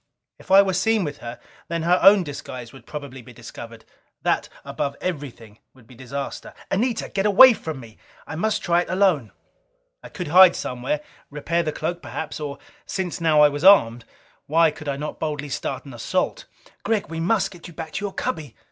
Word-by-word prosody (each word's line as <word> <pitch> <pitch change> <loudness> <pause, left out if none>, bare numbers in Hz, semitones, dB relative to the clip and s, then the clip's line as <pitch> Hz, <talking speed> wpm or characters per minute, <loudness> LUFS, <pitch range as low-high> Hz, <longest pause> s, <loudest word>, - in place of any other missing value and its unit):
If - - -17
I 195 +1 +8
were 190 -1 -1
seen 210 +3 +2
with 145 -3 -5
her, 120 +1 -8 0.3
then 165 -1 -3
her 175 +2 +3
own 195 +1 +7
disguise 130 -5 -8
would 135 - -15
probably 140 -3 -8
be 120 +1 -14
discovered. 115 -1 -11 0.4
That - - 0 0.2
above 140 - -3
everything, 135 - -6 0.2
would 125 -3 -19
be 125 - -16
disaster. 135 +3 -7 0.2
"Anita, 230 +5 0
get 195 +1 0
away 240 +5 +9
from 160 -9 -6
me! 115 -3 -14 0.3
I - - -8
must 215 +6 -1
try 175 0 +3
it - - -7
alone!" 185 - +2 0.7
I - - -11
could 180 -6 -6
hide 180 +2 +8
somewhere, 125 +4 -3 0.3
repair 160 +4 -1
the 155 - -2
cloak 170 +3 -4
perhaps. 160 - -6
Or, 145 -2 -5 0.3
since 185 -3 -3
now 155 -2 +4
I 150 - +7
was 145 +2 -5
armed, 120 -12 +6 0.4
why 160 +1 +4
could 155 0 -11
not 145 +2 -3
I - - -32
boldly 145 -2 -3
start - - -4
an 135 - -10
assault? 120 - -2 0.4
"Gregg, 215 -1 0
we 165 0 -5
must 195 +3 +1
get 175 -3 -12
you 175 - -12
back 160 -2 -7
to 200 - -4
your 200 - -5
cubby!" 150 -9 -4
155 Hz, 195 wpm, -23 LUFS, 135-185 Hz, 0.7 s, away